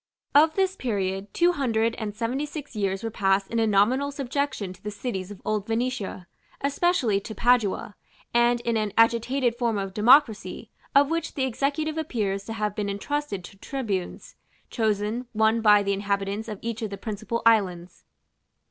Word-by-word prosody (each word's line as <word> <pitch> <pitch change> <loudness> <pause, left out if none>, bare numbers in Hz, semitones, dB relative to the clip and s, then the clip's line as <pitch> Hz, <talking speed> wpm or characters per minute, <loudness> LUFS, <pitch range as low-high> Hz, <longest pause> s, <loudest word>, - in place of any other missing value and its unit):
Of 310 +2 +5
this 380 -1 +1
period, 195 - -2
Two 350 +1 +3
Hundred 230 -7 0
and 210 -3 -5
Seventy 245 +6 -2
six 290 -4 -8
years 195 0 -1
were 225 - -3
passed 195 -1 +1
in 230 - 0
a 225 - +2
nominal 225 +8 +3
subjection 275 -7 -2
to 180 - -20
the 210 - -4
cities 205 -3 -4
of 205 -2 -9
old 210 -2 -1
Venetia, 225 -5 -2 0.4
especially 280 - +1
to 220 +2 -8
Padua, 235 -4 +1 0.4
and 240 0 +3
in 235 -1 0
an 210 -2 -1
agitated 235 +2 +3
form 235 -3 0
of 195 -1 -3
democracy, 220 -4 +3 0.2
of 285 +2 +5
which 330 0 -2
the 270 - 0
executive 290 +5 -1
appears 205 -10 -2
to 225 - -5
have 210 -2 -2
been 205 -1 -2
entrusted 205 0 -3
to 195 - -12
tribunes, 205 -6 -4 0.4
chosen, 220 +2 -1
one 220 +1 +3
by 210 -2 +6
the 200 0 0
inhabitants 200 +2 -2
of 215 -2 -5
each 230 0 -4
of 220 - -2
the 200 - -6
principal 220 +2 -4
islands. 185 -6 +2
225 Hz, 170 wpm, -25 LUFS, 200-255 Hz, 0.4 s, by